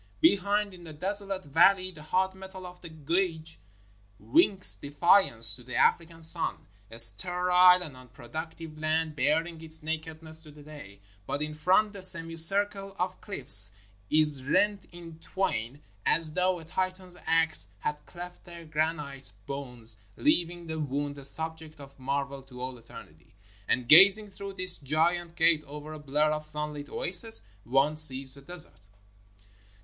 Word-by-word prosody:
Be 320 -10 +3
hind, 205 +1 -3
in 180 -1 -15
the 160 -2 -12
desolate 195 +3 -4
valley, 185 +6 +2
the 160 -4 -15
hot 185 +5 -2
metal 190 0 -12
of 180 0 -13
the 170 - -12
gauge 160 +1 -4 0.6
winks 205 - +2
defiance 145 - 0
to 115 - -10
the 125 0 -10
African 165 -1 -1
sun, 165 +1 0
— 100 0 -33
a 115 - -12
sterile 180 +8 +6
and 150 -6 -11
un 130 0 -16
productive 155 +5 -10
land 155 0 -3
baring 160 +4 -2
its 160 0 -1
nakedness 160 0 -8
to 155 - -16
the 150 0 -16
day, 145 -10 -14
— 100 0 -33
but 145 +1 -4
in 155 0 -7
front, 185 +7 0
the 200 - -11
semicircle 190 +3 +2
of 185 +1 -5
cliffs 130 - +5 0.4
is 150 -3 0
rent 200 +8 -1
in 170 -2 -14
twain 145 - -5 0.2
as 165 -2 -1
though 185 +2 -1
a 165 - -13
Titan's 185 +1 -6
axe 160 - +1
had 150 0 -5
cleft 175 0 -12
their 170 -1 -13
granite 150 -4 -5
bones, 125 -6 -5 0.2
leaving 175 - -1
the 160 -1 -7
wound 145 0 -5
a - - -13
subject 160 +2 -3
of 140 -1 -16
marvel 140 +1 -5
to 130 -2 -16
all 125 -1 -8
eternity. 80 -8 -17 0.3
And, 125 -2 -2
gazing 200 - +6
through 200 0 -10
this 185 -1 +3
giant 165 +4 -2
gate 165 -2 +1
over 150 +2 -11
a 155 - -10
blur 150 +1 -1
of 155 0 -5
sunlit 150 -1 -7
oasis, 190 +10 +1 0.2
one 135 +6 0
sees 135 -3 +8
the 140 - +6
desert. 155 - -2
160 Hz, 160 wpm, -26 LUFS, 145-180 Hz, 0.6 s, sees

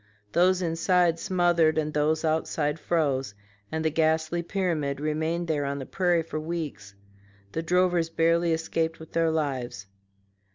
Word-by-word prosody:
Those 180 +4 +3
inside 170 0 +2
smothered 175 -4 +2
and 155 -1 -1
those 155 +2 +1
outside 155 -1 0
froze, 140 -10 0 0.4
and 160 0 -2
the 160 - +2
ghastly 160 +2 +1
pyramid 165 -7 -1
remained 160 +3 -1
there 150 -3 0
on 140 0 -2
the 135 - -5
prairie 175 0 +1
for 155 -1 -5
weeks: 155 -12 -5 0.6
the 165 - -2
drovers 175 0 +2
barely 165 +1 +2
escaped 165 0 -1
with 160 - -12
their 165 -1 +2
lives. 135 -10 -2
160 Hz, 140 wpm, -27 LUFS, 150-170 Hz, 0.6 s, Those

